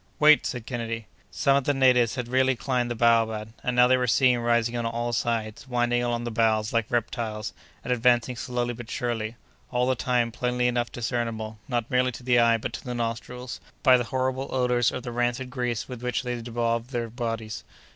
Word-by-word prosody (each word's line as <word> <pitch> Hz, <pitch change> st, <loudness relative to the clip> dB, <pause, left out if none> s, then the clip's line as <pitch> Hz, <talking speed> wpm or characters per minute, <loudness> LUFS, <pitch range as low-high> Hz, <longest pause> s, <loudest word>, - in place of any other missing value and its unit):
"Wait!" 150 Hz, 0 st, +6 dB
said 125 Hz, -3 st, -5 dB
Kennedy. 115 Hz, -2 st, -4 dB, 0.2 s
Some 140 Hz, +8 st, +2 dB
of 140 Hz, -, -1 dB
the 145 Hz, -, +2 dB
natives 125 Hz, -3 st, +4 dB
had 125 Hz, -3 st, -3 dB
really 130 Hz, +1 st, +2 dB
climbed 125 Hz, -1 st, -1 dB
the 120 Hz, -, -2 dB
baobab, 110 Hz, -2 st, +2 dB
and 125 Hz, -, -1 dB
now 125 Hz, 0 st, +7 dB
they 130 Hz, +1 st, +4 dB
were 125 Hz, 0 st, 0 dB
seen 125 Hz, +1 st, +4 dB
rising 120 Hz, 0 st, +1 dB
on 120 Hz, -, -1 dB
all 120 Hz, +1 st, -2 dB
sides, 115 Hz, 0 st, -2 dB
winding 120 Hz, -1 st, +1 dB
along 120 Hz, -1 st, -1 dB
the 120 Hz, -, -3 dB
boughs 110 Hz, -1 st, +1 dB
like 115 Hz, -2 st, +1 dB
reptiles, 110 Hz, -3 st, -2 dB, 0.3 s
and 125 Hz, -, 0 dB
advancing 125 Hz, 0 st, +2 dB
slowly 120 Hz, 0 st, -2 dB
but 120 Hz, 0 st, -9 dB
surely, 115 Hz, -2 st, -2 dB, 0.3 s
all 125 Hz, -1 st, +1 dB
the 130 Hz, -, +2 dB
time 120 Hz, -1 st, 0 dB
plainly 125 Hz, +2 st, 0 dB
enough 120 Hz, -1 st, 0 dB
discernible, 115 Hz, -2 st, -3 dB
not 120 Hz, -3 st, -2 dB
merely 125 Hz, 0 st, +2 dB
to 125 Hz, -, -9 dB
the 120 Hz, -1 st, +4 dB
eye 115 Hz, -1 st, +5 dB
but 110 Hz, -, -5 dB
to -, -, -6 dB
the 125 Hz, -1 st, -4 dB
nostrils, 120 Hz, +2 st, -4 dB, 0.2 s
by 130 Hz, -2 st, +7 dB
the 120 Hz, -1 st, +1 dB
horrible 130 Hz, +1 st, -1 dB
odors 125 Hz, -2 st, +2 dB
of 125 Hz, -, -5 dB
the 125 Hz, -, -5 dB
rancid 120 Hz, +1 st, -1 dB
grease 120 Hz, -3 st, -2 dB
with 125 Hz, -2 st, -8 dB
which 125 Hz, +2 st, -1 dB
they 125 Hz, -1 st, -2 dB
bedaub 115 Hz, 0 st, -2 dB
their 120 Hz, -3 st, -3 dB
bodies. 115 Hz, -2 st, -4 dB
120 Hz, 205 wpm, -26 LUFS, 115-125 Hz, 0.3 s, now